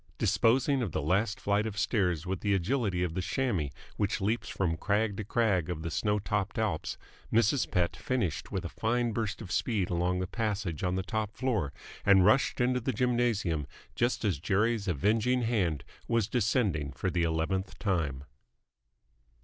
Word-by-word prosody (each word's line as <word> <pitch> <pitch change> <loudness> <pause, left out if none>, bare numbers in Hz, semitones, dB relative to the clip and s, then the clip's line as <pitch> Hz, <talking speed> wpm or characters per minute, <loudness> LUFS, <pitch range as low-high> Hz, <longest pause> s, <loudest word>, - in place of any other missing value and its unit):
Disposing 130 +4 +3
of 100 -10 -2
the - - 0
last 100 +7 +1
flight 105 +2 +1
of 105 -2 -6
stairs 90 - +1
with 95 0 -2
the 100 -1 +1
agility 95 -2 0
of 85 -3 -2
the 95 - -1
chamois 95 - -1 0.3
which 100 -1 0
leaps 110 +5 -1
from 85 -4 0
crag 105 +4 0
to 110 - -3
crag 100 -6 +1
of 80 -2 -4
the 85 - -3
snow 105 +5 +1
topped 100 -1 -2
Alps, 105 -8 -1 0.3
Mrs. 115 +4 +3
Pett 85 -1 0
finished 115 -12 -2
with 95 -2 -2
a - - -3
fine 120 +4 0
burst 110 -1 -3
of 90 - -9
speed 100 -5 0
along 90 +1 +1
the 95 - -1
passage 100 -6 -2
on 90 0 +1
the 95 - -1
top 110 +1 -3
floor, 110 - 0 0.3
and 95 -2 +6
rushed 120 +7 +3
into 125 +1 +2
the 130 +2 -1
gymnasium 115 - 0 0.3
just 120 -1 0
as 95 -9 +1
Jerry's 105 +5 +1
avenging 110 - +2
hand 95 - 0 0.2
was 115 -3 +1
descending 105 - +1
for 95 +6 -2
the 85 0 0
eleventh 85 +4 -1
time. 80 -10 -1
100 Hz, 175 wpm, -30 LUFS, 90-115 Hz, 0.3 s, and